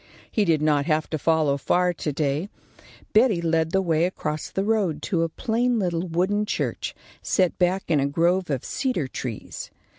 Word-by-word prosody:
He 210 - +2
did 160 -4 +2
not 150 -2 +2
have 155 -1 +1
to 155 - -1
follow 155 -2 +2
far 180 +5 +2
to 155 -2 -3
day. 145 +5 -1 0.6
Betty 220 -4 +4
led 165 -1 +1
the 190 0 +2
way 165 -1 +2
across 155 -4 -3
the 195 - -1
road 195 -8 0
to 170 -4 0
a 165 - +1
plain 240 +5 0
little 180 -3 -1
wooden 190 +5 0
church, - - -2 0.3
set 185 -3 +1
back 185 +2 +2
in 155 -4 +2
a 140 - +1
grove 175 +5 +1
of 135 -4 -2
cedar 255 - -1
trees. 125 -4 -6
170 Hz, 180 wpm, -24 LUFS, 155-190 Hz, 0.6 s, Betty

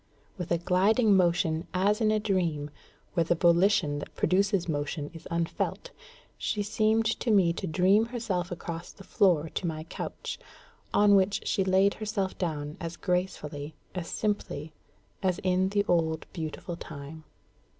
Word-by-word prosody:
With 180 -4 -5
a 170 - +4
gliding 200 +5 +3
motion 170 -3 +2
as 205 +4 +2
in 215 - +4
a 215 0 +2
dream, 170 -8 -1 0.4
where 170 - +3
the 170 +1 +1
volition 170 -3 +3
that - - -9
produces 195 -1 +2
motion 145 -1 -3
is 165 - -10
unfelt, 170 - -2 0.5
she 210 -2 -1
seemed 220 +2 +2
to 245 - -2
me 190 -6 +4
to 190 - -4
dream 190 +7 +3
herself 210 -7 -2
across 170 0 -6
the 195 - -14
floor 180 -8 +3
to 175 - -3
my 155 -1 -3
couch, 165 - -6 0.5
on 205 0 +5
which 195 0 +3
she 195 - +2
laid 190 +1 +3
herself 210 -3 -2
down 150 -4 -3
as 170 -1 -5
gracefully, 160 -5 -2 0.2
as 180 -3 -4
simply, 160 -8 -2 0.5
as 185 -3 +1
in 185 0 +2
the 205 0 +1
old 160 -2 +1
beautiful 170 +2 -5
time. 150 0 -9
180 Hz, 150 wpm, -28 LUFS, 165-200 Hz, 0.5 s, on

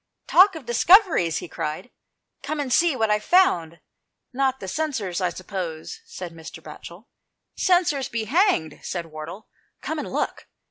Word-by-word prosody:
"Talk 380 +1 +6
of 315 -6 -9
discoveries," 240 - +4
he - - -6
cried, 155 +9 -5 0.5
"come 295 +2 -4
and 270 -4 -1
see 335 -4 +3
what 220 -3 +1
I've 210 0 +1
found." 170 - +2 0.5
"Not 265 0 0
the 190 - -7
censers, 215 - -2
I 180 - +1
suppose," 180 - -6
said 180 - -8
Mr. 160 0 -10
Batchel. 170 +5 -11 0.3
" - - -56
Censers 340 -8 +2
be 230 -1 -2
hanged," 260 - +1
said 175 -2 -4
Wardle, 165 +6 -9 0.2
" - - -46
come 315 - -3
and - - -5
look." - - -3
225 Hz, 165 wpm, -24 LUFS, -, 0.5 s, Talk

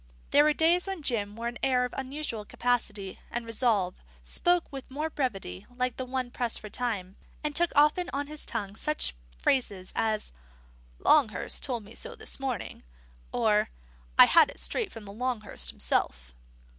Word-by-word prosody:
There 290 - +7
were 305 - +5
days 340 +4 +3
when 385 -5 -4
Jim 210 -6 +1
wore 230 +1 -3
an 240 0 -5
air 255 -2 +3
of 250 - -6
unusual 270 -4 -4
capacity 210 -4 -1
and 240 0 -3
resolve, 225 -5 +1 0.2
spoke 350 - +2
with 270 -1 -7
more 305 +4 -3
brevity 195 - -3
like 250 0 -1
one 255 -1 -2
pressed 240 -2 -1
for 210 - -9
time, 200 -6 -3 0.3
and 300 -1 -2
took 345 0 +5
often 300 +5 +4
on 285 +1 -2
his 300 +1 -3
tongue 200 -1 -3
such 300 - +2 0.2
phrases 200 - 0
as 215 -1 0 0.7
"Longhurst 270 - +3
told 245 -5 -1
me 210 +3 -13
so 485 - -5
this - - -2
morning," 260 -6 -4 0.5
or 215 -3 +2 0.5
"I - - +11
had 330 -3 +6
it - - -7
straight 440 -5 -1
from 225 -2 -10
Longhurst 215 - -4
himself." - - -1
245 Hz, 160 wpm, -29 LUFS, 210-290 Hz, 0.7 s, I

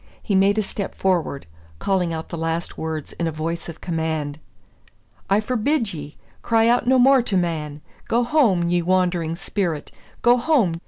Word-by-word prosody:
He 210 - -2
made 195 +2 +4
a 215 - +2
step 200 0 -5
forward, 175 - 0 0.3
calling 180 - 0
out 160 0 -5
the - - -5
last 165 +1 -2
words 160 -2 -5
in 170 - 0
a - - -1
voice 165 +2 -4
of 165 - -10
command. 160 -3 -2 0.9
"I 200 +1 +4
forbid 230 - 0
ye! 145 -2 -8 0.2
Cry 225 -1 +3
out 240 0 +2
no 260 +1 +5
more 265 +1 +6
to 215 -5 -1
man. 155 -4 -2 0.3
Go 235 +1 +2
home, 235 - +3
ye 175 0 +2
wandering 175 -2 +1
spirit! 175 -4 -3 0.3
go 240 +1 +6
home! 235 - +2
180 Hz, 170 wpm, -22 LUFS, 165-220 Hz, 0.9 s, more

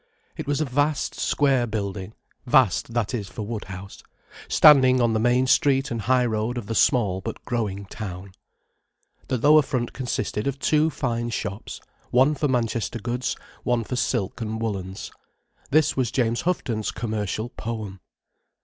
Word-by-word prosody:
It - - -6
was 145 0 0
a 155 - +1
vast 145 +2 0
square 135 -4 +1
building—vast, 110 +2 -1
that 120 0 0
is, 105 -5 -3
for 110 - -6
Woodhouse—standing 115 +6 +2
on 120 -2 +2
the 110 - +1
main 120 +3 +3
street 135 -1 +3
and 115 -1 -2
high 125 +3 +2
road 110 +1 -1
of 120 - -4
the 115 - -3
small 105 -6 +2
but - - -7
growing 105 -5 -2
town. 95 -2 -7 1.0
The 130 - 0
lower 150 +6 +6
front 125 -4 -3
consisted 125 -3 -2
of 140 -1 -1
two 155 +2 +2
fine 120 -5 -2
shops, 100 -2 -5 0.3
one 130 +5 +4
for 150 +1 0
Manchester 115 -3 -1
goods, 120 +2 -2 0.3
one 120 -2 0
for 125 - -4
silk 120 -4 -1
and 110 0 -3
woollens. 95 -4 -4 0.6
This 155 +3 +3
was 130 -3 0
James 120 -1 0
Houghton's 120 - -1
commercial 110 0 -3
poem. 110 -5 -6
120 Hz, 150 wpm, -24 LUFS, 105-130 Hz, 1.0 s, lower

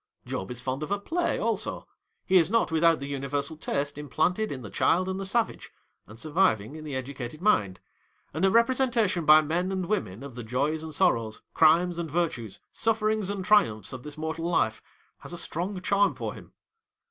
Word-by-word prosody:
Job 95 - -4
is 125 0 -4
fond 130 +2 -3
of 150 - -4
a 205 - +1
play, 335 - -1
also. - - -2 0.4
He 190 - +4
is 165 -2 +4
not 230 -6 +2
without 165 0 +4
the 140 - -5
uni 140 -1 -4
versal 145 +3 -3
taste 145 +1 -2
implanted 180 +9 0
in 130 -3 -6
the 105 - -8
child 185 +2 +2
and 190 0 -3
the 195 - -3
savage, 230 +3 -1 0.4
and 110 +2 -13
surviving 150 - +1
in 155 - -8
the 150 -3 -5
educated 130 +1 -6
mind; 105 - +2 0.5
and - - -3
a 195 - +5
representation 230 -5 +2
by 155 +1 +8
men 175 +5 -1
and 190 -1 -2
women, 120 - -2
of 140 -2 -8
the 120 - -7
joys 140 +7 -1
and 160 0 -6
sorrows, 115 - +1
crimes 170 +2 +4
and 165 -2 -3
virtues, 145 - -2
sufferings 215 -2 0
and 200 -2 -3
triumphs, 130 - +3
of 130 - -7
this 150 +2 -9
mortal 160 +1 -4
life, 110 -10 +1 0.4
has - - -9
a - - -5
strong 180 +4 -3
charm 200 +1 +2
for - - -4
him. - - -13
160 Hz, 195 wpm, -27 LUFS, 140-190 Hz, 0.5 s, by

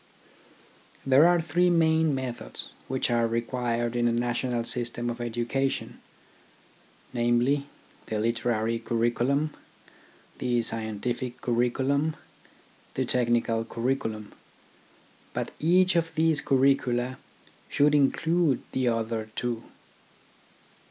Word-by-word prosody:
There 135 +4 +6
are 175 0 +4
three 170 +3 +2
main 160 -3 +3
methods 130 -2 -5 0.2
which 130 -1 -1
are 115 -1 +2
required 120 0 -1
in 120 0 +2
a - - +2
national 120 0 -1
system 120 0 -2
of 120 0 -6
education, 120 +3 -2 1.1
namely, 120 +4 +2 0.4
the 110 - -2
literary 115 0 0
curriculum, 120 +7 0 0.9
the 120 -2 +1
scientific 115 +3 -2
curriculum, 135 +5 +1 0.8
the 130 - 0
technical 120 -2 +1
curriculum. 115 -3 -3 1.0
But - - -3
each 180 +3 +4
of 165 -1 0
these 160 -2 +2
curricula 130 -2 +2 0.5
should 145 0 +3
include 155 +1 +2
the 130 -1 0
other 115 -1 -1
two. 120 -2 -3
125 Hz, 100 wpm, -27 LUFS, 115-140 Hz, 1.1 s, There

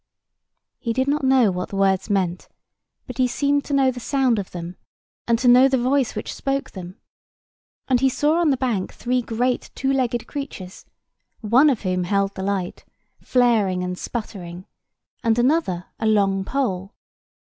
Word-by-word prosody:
He 230 -3 -2
did 260 +3 0
not 290 0 0
know 260 -5 +4
what 180 0 -4
the - - -7
words 195 0 +1
meant: 185 -3 -1 0.6
but 250 -1 -9
he 255 - +4
seemed 285 +3 0
to 290 - -4
know 265 -1 +3
the 250 - -8
sound 255 -3 +1
of 195 - -5
them, 175 0 -7 0.5
and 235 -1 +3
to 250 +2 0
know 250 +2 +7
the 265 -1 +1
voice 255 +1 +1
which - - -5
spoke 275 0 -2
them; 185 -1 -9 0.9
and 255 -2 +3
he 265 +1 +3
saw 300 +5 +1
on 340 -3 +3
the 270 - +2
bank 235 -8 -1
three 250 +1 0
great 245 +2 -1
two 270 +1 0
legged 245 -3 0
creatures, 235 -10 -7 0.6
one 250 +7 +5
of 250 -7 -1
whom 185 -1 -1
held 200 +1 0
the - - -6
light, 190 -2 -3 0.4
flaring 220 -8 +2
and 180 0 -3
sputtering, 185 -6 -6 0.6
and 225 -1 +2
another 240 - +1
a 220 - 0
long 195 -3 +2
pole. 195 -6 -2
235 Hz, 170 wpm, -22 LUFS, 195-265 Hz, 0.9 s, know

